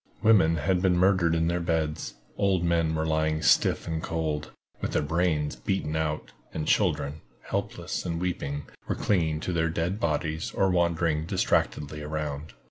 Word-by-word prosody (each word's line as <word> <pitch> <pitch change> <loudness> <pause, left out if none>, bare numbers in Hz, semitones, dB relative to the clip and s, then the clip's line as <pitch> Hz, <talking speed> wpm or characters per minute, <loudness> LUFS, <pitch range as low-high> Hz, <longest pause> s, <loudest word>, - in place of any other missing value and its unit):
Women 100 -7 +5
had 90 +3 +1
been 90 -2 +3
murdered 90 -2 +3
in 80 0 +2
their 85 +1 0
beds, 80 -3 -1 0.2
old 95 -3 +2
men 85 -2 +2
were 80 0 0
lying 80 0 0
stiff - - +3
and 80 -1 -2
cold, 80 -3 -2 0.3
with - - -2
their - - +2
brains 80 -1 0
beaten 80 -5 -2
out, 80 -1 -2 0.2
and 75 -1 -2
children, 75 +3 +1 0.3
helpless - - -3
and 85 -1 -2
weeping, 75 -5 -2 0.2
were - - 0
clinging 80 -6 +1
to 90 - -2
their 80 -1 +1
dead 85 +5 -1
bodies 80 -8 -1
or 95 -1 +2
wandering 85 -3 +1
distractedly 75 -2 0
around. 75 0 -4
80 Hz, 160 wpm, -27 LUFS, 75-90 Hz, 0.3 s, Women